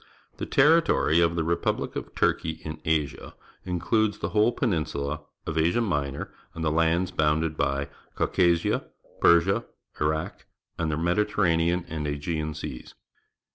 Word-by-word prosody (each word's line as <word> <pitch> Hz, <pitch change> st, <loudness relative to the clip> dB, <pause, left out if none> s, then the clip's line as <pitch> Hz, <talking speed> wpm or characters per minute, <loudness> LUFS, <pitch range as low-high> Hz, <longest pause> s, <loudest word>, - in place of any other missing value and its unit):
— -, -, -36 dB
The -, -, -3 dB
territory 150 Hz, -, +4 dB
of 85 Hz, 0 st, +3 dB
the 80 Hz, -, 0 dB
repul)lie 85 Hz, +1 st, -1 dB
of -, -, -6 dB
Turkeij 80 Hz, -1 st, 0 dB
in 75 Hz, 0 st, -7 dB
Asia 80 Hz, -3 st, -1 dB, 0.3 s
includes 100 Hz, +4 st, 0 dB
the -, -, -3 dB
whole 105 Hz, +2 st, +3 dB
jieninsula 75 Hz, -, -2 dB, 0.2 s
of 80 Hz, +1 st, -1 dB
Asia 85 Hz, +8 st, +2 dB
Minor, 75 Hz, -11 st, -2 dB, 0.2 s
and 80 Hz, -1 st, -3 dB
the 75 Hz, -, +2 dB
lands 85 Hz, +3 st, +1 dB
Wounded 80 Hz, +1 st, +1 dB
by 70 Hz, -1 st, 0 dB, 0.3 s
Caucasia, 85 Hz, -2 st, +2 dB, 0.3 s
Persia, 95 Hz, +6 st, +4 dB, 0.4 s
Iraq, 80 Hz, +1 st, -2 dB, 0.3 s
and 80 Hz, -1 st, 0 dB
the 75 Hz, -, -1 dB
Mediterranean 85 Hz, -1 st, +1 dB
and 75 Hz, -2 st, -4 dB
Aegean 75 Hz, +1 st, -3 dB
Seas. 70 Hz, -5 st, -7 dB
80 Hz, 135 wpm, -26 LUFS, 75-90 Hz, 0.4 s, territory